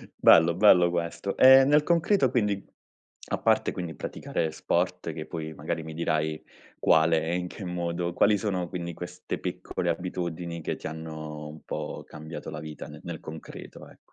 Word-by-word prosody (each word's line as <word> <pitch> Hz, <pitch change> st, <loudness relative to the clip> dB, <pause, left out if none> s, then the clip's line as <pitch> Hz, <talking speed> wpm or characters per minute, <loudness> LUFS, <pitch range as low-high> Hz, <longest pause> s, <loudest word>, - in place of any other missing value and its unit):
Bello, 85 Hz, +1 st, +6 dB
bello 90 Hz, -3 st, +6 dB
questo. 85 Hz, +3 st, -2 dB
Ehm, 130 Hz, +1 st, +8 dB
nel 150 Hz, +1 st, +5 dB
concreto 170 Hz, -2 st, +3 dB
quindi, 105 Hz, -6 st, 0 dB, 0.7 s
a -, -, 0 dB
parte -, -, +2 dB
quindi 85 Hz, -3 st, -5 dB
praticare 80 Hz, +3 st, -3 dB
sport, 80 Hz, -, -1 dB
che -, -, -6 dB
poi 80 Hz, -1 st, -6 dB
magari 80 Hz, +2 st, -4 dB
mi 80 Hz, 0 st, -7 dB
dirai 80 Hz, -1 st, -1 dB, 0.4 s
quale 80 Hz, 0 st, +4 dB
e 85 Hz, +2 st, -1 dB
in 90 Hz, 0 st, -2 dB
che 95 Hz, +2 st, -8 dB
modo 85 Hz, 0 st, -2 dB
quali 105 Hz, +3 st, +4 dB
sono 95 Hz, -4 st, -2 dB
quindi 85 Hz, -2 st, -4 dB
queste 90 Hz, +2 st, -6 dB
piccole 85 Hz, -, -3 dB
abitudini 85 Hz, -1 st, -3 dB
che -, -, -2 dB
ti -, -, -7 dB
hanno 80 Hz, -1 st, -7 dB
un 75 Hz, +1 st, -10 dB
po' -, -, -5 dB
cambiato 80 Hz, +2 st, -8 dB
la -, -, -5 dB
vita 75 Hz, 0 st, -8 dB
ne -, -, -10 dB
nel -, -, -6 dB
concreto, 80 Hz, 0 st, -10 dB
ec -, -, -18 dB
85 Hz, 170 wpm, -27 LUFS, 80-90 Hz, 0.7 s, Ehm